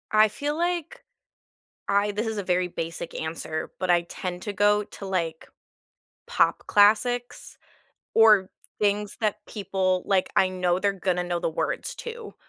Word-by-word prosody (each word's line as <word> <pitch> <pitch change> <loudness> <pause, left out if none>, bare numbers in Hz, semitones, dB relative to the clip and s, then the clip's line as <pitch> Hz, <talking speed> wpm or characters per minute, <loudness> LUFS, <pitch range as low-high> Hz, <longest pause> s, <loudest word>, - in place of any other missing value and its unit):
I 215 0 +6
feel 290 +8 -3
like, 345 -2 -2 0.8
I 200 +1 +2
this 210 +3 -2
is 220 -1 -3
a 200 - -2
very 180 0 +1
basic 165 -1 -5
answer, 160 0 -4
but 185 - -2
I 175 -1 +4
tend 180 +1 -6
to 205 - -4
go 205 +1 +3
to, 200 - -10
like, 170 -4 -2 0.8
pop - - +1
classics, 225 +4 +2 0.6
or 210 -4 +6 0.3
things 205 -1 0
that 215 -1 +1
people 190 -3 -1
like, 190 -2 +1
I 190 - +4
know 180 -1 0
they're 200 +1 +1
gonna 180 -2 -1
know 175 -1 -2
the - - -1
words 160 - -3
to, 470 -2 -8
200 Hz, 155 wpm, -25 LUFS, 180-215 Hz, 0.8 s, I